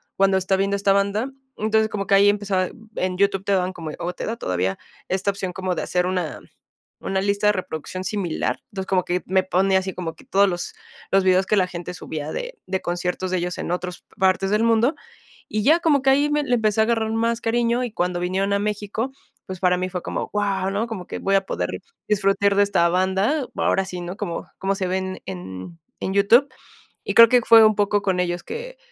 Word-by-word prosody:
cuando 195 0 +3
está 190 +1 +1
viendo 195 +1 0
esta 200 0 +3
banda. 200 +5 0 0.3
Entonces, 220 0 +1
como 200 -2 -4
que 195 - +4
ahí 200 +1 +6
empezaba 200 -3 0 0.3
en 185 0 -1
YouTube 195 0 +1
te 200 - -2
daban 185 -1 +1
como 165 -4 -6
o 175 +1 -3
te - - -6
da 230 +1 -3
todavía 90 - -1 0.3
esta 190 +2 0
opción 190 -2 -4
como 185 0 -3
de - - -2
hacer 180 0 0
una 180 -4 -2 0.6
una 190 0 -1
lista 200 +1 0
de 210 - +6
reproducción 185 -1 -5
similar. 190 -4 -2
Entonces, 190 -1 -4
como 185 -2 +2
que 180 0 -1
me 190 0 +2
pone 190 +1 +2
así 190 0 -1
como 165 -3 -5
que - - -17
todos 200 -5 +3
los 175 -1 -4 0.4
los 195 - +5
videos 185 0 +3
que - - +1
la 185 - +3
gente 175 0 -6
subía 155 -3 -6
de - - -5
de 190 0 -2
conciertos 180 +1 -2
de 185 - +1
ellos 175 +1 -3
en - - -4
otros 180 0 -4
partes 190 0 +2
del 210 +2 +2
mundo, 230 +5 +3 0.5
y 215 0 -1
ya 315 +6 +6
como 290 -5 +3
que 270 - +4
ahí 285 +2 +3
me 295 0 +1
le 250 - +1
empecé 220 -1 +1
a - - +4
agarrar 225 -1 0
más 230 +1 0
cariño, 235 +2 +1
y 240 - -5
cuando 180 -3 -1
vinieron 190 +3 0
a - - +2
México, 210 +4 -3 0.3
pues 185 -2 -7
para 180 -1 +3
mí 185 0 -2
fue 180 -1 -4
como: - - -3
"Guau", 195 -2 0
¿no? 215 +4 -1
Como 195 -6 -6
que - - -5
voy 195 0 +2
a 195 - 0
poder - - -2 0.4
disfrutar 200 -1 +2
de 205 - +5
esta 170 -4 +2
banda, 190 - +1
bu - - -3
ahora 195 - +2
sí, 180 -2 -6
¿no? 175 +2 -6
Como 185 -5 -5
como 195 +1 0
se 190 -2 -2
ven 190 0 -3
en 95 - -8 0.2
en 190 - -2
YouTube. 230 +8 +5 0.6
Y - - -3
creo 230 0 +10
que 250 0 +5
fue 225 -1 +8
un 215 -1 +4
poco 205 0 +1
con 190 -2 0
ellos 175 -1 -1
que - - -7
195 Hz, 225 wpm, -22 LUFS, 180-215 Hz, 0.6 s, creo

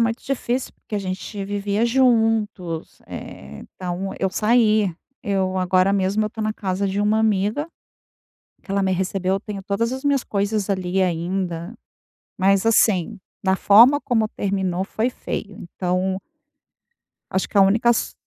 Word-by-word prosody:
muito 230 +1 0
difícil 260 -1 -2
porque - - -10
a - - +1
gente 195 +1 -5
vivia 205 +2 -1
juntos, 225 -8 +1
eh, 70 +1 -9
então, 185 +1 -5
eu 190 - +1
saí. 215 -3 +3 0.3
Eu 190 -2 -1
agora 185 +1 +2
mesmo, 200 +2 +1
eu - - 0
estou 220 +1 -6
na 215 - 0
casa 195 -1 -2
de 195 +1 -1
uma 210 +1 +2
amiga, 215 +6 +1 1.0
que 195 - -9
ela 200 0 +1
me 190 - +1
recebeu. 185 0 0
Eu 195 - -2
tenho 200 -1 -7
todas 210 +4 -1
as 265 - -6
minhas 280 -2 +2
coisas 205 0 -1
ali 190 -1 0
ainda. 175 +1 -2 0.6
Mas, 195 +2 +3
assim, 215 -6 +3 0.3
na 190 0 +3
forma 235 +10 +6
como 225 -4 +1
terminou, 190 -3 -2
foi 220 +4 -1
feio. 205 -4 -6 0.2
Então 185 +1 -1 1.1
acho 190 - -1
que 205 - 0
a - - +8
única 215 +5 +4
so - - -2
200 Hz, 155 wpm, -22 LUFS, 190-220 Hz, 1.1 s, a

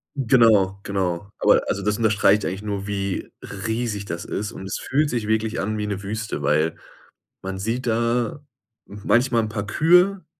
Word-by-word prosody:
Genau, 110 -7 +4
genau. 95 -1 -2
Aber - - +5
also, 100 - -1
das 105 +1 0
unterstreicht 105 -2 +3
eigentlich 95 +2 -3
nur, 100 -1 -4
wie 100 -2 -3
riesig 105 +1 -3
das 85 -3 -5
ist 105 0 -4
und 95 - -9
es 95 - -3
fühlt 145 +3 0
sich 115 -5 -2
wirklich 110 +1 0
an 110 +2 -2
wie 105 - -2
'ne 100 -2 -3
Wüste, 105 -3 -4
weil 75 +3 +1 0.7
man 95 0 -5
sieht 115 +6 -2
da 115 +4 0 0.4
manchmal 115 +4 +1
'n 110 - -3
paar 105 -1 -4
Kühe, 180 - +3
105 Hz, 165 wpm, -23 LUFS, 100-115 Hz, 0.7 s, Aber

